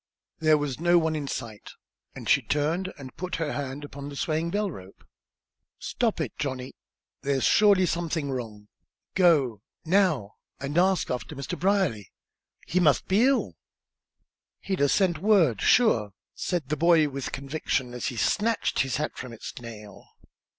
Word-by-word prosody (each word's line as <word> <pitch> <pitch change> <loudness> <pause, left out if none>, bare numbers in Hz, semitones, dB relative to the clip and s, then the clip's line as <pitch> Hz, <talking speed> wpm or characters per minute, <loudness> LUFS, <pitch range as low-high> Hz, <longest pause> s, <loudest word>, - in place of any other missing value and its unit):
There 155 -1 +4
was 145 -3 -3
no 175 +1 +4
one 160 -1 +1
in 145 -2 -3
sight, 115 -6 -6 0.4
and - - -8
she - - +5
turned 165 +6 -1
and 135 -3 -10
put 180 +1 -4
her 160 -5 -2
hand 140 +1 -4
upon 140 0 -8
the 145 - -9
swaying 160 +3 -1
bell 205 +1 -1
rope. 95 - -12 0.7
"Stop 230 -7 -1
it, 150 -8 -3
Johnny! 130 -3 -4 0.5
There's 135 -2 0
surely 200 -3 +5
something 165 -4 -2
wrong! 110 -5 -6 0.5
Go, 145 - +3 0.2
now, 160 - +1 0.2
and 140 +2 -4
ask 185 +1 +2
after 125 +5 -4
Mr. 140 +6 -4
Brierly. 180 - +1 0.5
He 185 - 0
must 150 -6 +3
be 205 +6 +4
ill!" 270 0 +1 1.1
"He'd 190 -4 -3
'a 145 - +4
sent 175 -3 +2
word, 180 - +3
sure," 115 - +3 0.2
said 170 -7 -3
the 155 - -1
boy, 165 -1 +4
with 140 -2 -5
conviction, 135 -2 -2
as 125 - -3
he 125 - -4
snatched 225 - +1
his 130 -3 +1
hat 150 +1 -2
from 125 - -7
its 115 - -8
nail. 105 -4 -11
150 Hz, 155 wpm, -26 LUFS, 130-180 Hz, 1.1 s, she